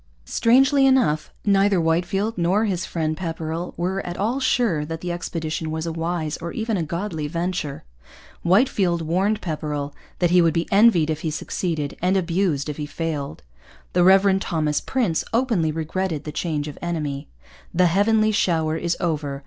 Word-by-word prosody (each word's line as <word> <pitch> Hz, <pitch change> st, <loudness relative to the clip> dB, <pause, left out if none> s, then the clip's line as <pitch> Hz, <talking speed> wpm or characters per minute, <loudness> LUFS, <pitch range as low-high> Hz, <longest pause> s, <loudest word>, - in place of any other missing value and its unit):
Strangely 270 Hz, +4 st, +4 dB
enough, 235 Hz, -, +2 dB
neither 200 Hz, -1 st, +3 dB
Whitefield 175 Hz, +7 st, 0 dB
nor 185 Hz, +5 st, +2 dB
his 185 Hz, -4 st, -2 dB
friend 155 Hz, -2 st, -1 dB
Pepperrell 165 Hz, 0 st, -4 dB
was 185 Hz, +3 st, -1 dB
at 175 Hz, 0 st, -6 dB
all 230 Hz, +7 st, 0 dB
sure 235 Hz, -, +1 dB
that 165 Hz, +1 st, -6 dB
the 180 Hz, -, -3 dB
expedition 165 Hz, -2 st, -3 dB
was 160 Hz, +1 st, -3 dB
a 165 Hz, -, -2 dB
wise 165 Hz, -1 st, -2 dB
or 170 Hz, +1 st, -6 dB
even 225 Hz, -1 st, -2 dB
a 180 Hz, -, 0 dB
godly 165 Hz, -1 st, -3 dB
venture. 170 Hz, -2 st, -3 dB, 0.6 s
Whitefield 185 Hz, -3 st, +2 dB
warned 195 Hz, +6 st, 0 dB
Pepperrell 150 Hz, -3 st, -3 dB, 0.2 s
that 175 Hz, -1 st, +1 dB
he 180 Hz, 0 st, +6 dB
would 165 Hz, -1 st, +2 dB
be 165 Hz, -, 0 dB
envied 195 Hz, -7 st, +5 dB
if 155 Hz, 0 st, -3 dB
he 160 Hz, -, -1 dB
succeeded 155 Hz, -1 st, -3 dB
and 185 Hz, +2 st, +2 dB
abused 170 Hz, -5 st, 0 dB
if 150 Hz, -, -4 dB
he 150 Hz, -1 st, -4 dB
failed. 155 Hz, -3 st, -4 dB, 0.5 s
The 180 Hz, -, +4 dB
Reverend 195 Hz, +1 st, +5 dB
Thomas 155 Hz, -4 st, 0 dB
Prince 225 Hz, -12 st, 0 dB
openly 225 Hz, -10 st, +1 dB
regretted 165 Hz, +1 st, -2 dB
the 150 Hz, -, -5 dB
change 150 Hz, -1 st, -2 dB
of 150 Hz, -, -8 dB
enemy. 150 Hz, -4 st, -3 dB, 0.4 s
'The 180 Hz, +1 st, +3 dB
Heavenly 215 Hz, +5 st, +3 dB
shower 160 Hz, -6 st, +1 dB
is 170 Hz, +1 st, -1 dB
over. 150 Hz, -5 st, -2 dB
170 Hz, 165 wpm, -23 LUFS, 155-195 Hz, 0.6 s, he